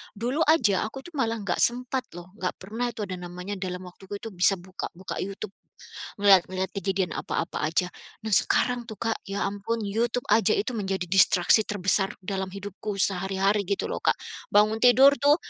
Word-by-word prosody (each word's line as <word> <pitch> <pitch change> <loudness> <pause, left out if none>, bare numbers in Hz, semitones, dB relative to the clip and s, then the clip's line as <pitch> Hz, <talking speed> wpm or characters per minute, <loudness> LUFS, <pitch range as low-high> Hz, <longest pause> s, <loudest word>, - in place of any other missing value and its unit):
dulu 245 +8 -2
aja 220 - +3
aku 270 +4 -9
tuh 350 - -12
malah 230 -2 +1
nggak 195 - -1
sempat 250 +1 0
loh, 175 +1 -10
nggak 180 - -2
pernah 225 +6 -4
itu 225 -3 -5
ada 185 -2 -5
namanya 180 +3 -6
dalam 185 -1 -4
waktu 180 +1 -13
itu 225 +2 -7
bisa 185 +1 +3
buka-buka 185 0 -7
YouTube, 195 +1 -5 0.7
ngelihat-ngelihat 190 -1 +4
kejadian 195 -3 -1
apa-apa 165 - -3
aja. 170 +3 +1 0.4
Nah - - -3
sekarang 245 +3 +2
tuh, 220 -4 -10
Kak, 225 -1 -2
ya 195 0 -2
ampun 205 +3 -3
YouTube 235 +4 -1
aja 220 -1 +4
itu 225 +5 0
menjadi 190 -3 -2
distraksi 190 +3 +4
terbesar 195 0 0
dalam 190 0 -4
hidupku 200 +1 -6
sehari-hari 195 +2 +1
gitu 200 - 0
loh, - - -3
Kak. - - +3 0.3
Bangun 215 +2 +4
tidur 260 +3 +7
tuh 285 +2 +5
200 Hz, 170 wpm, -26 LUFS, 190-225 Hz, 0.7 s, tidur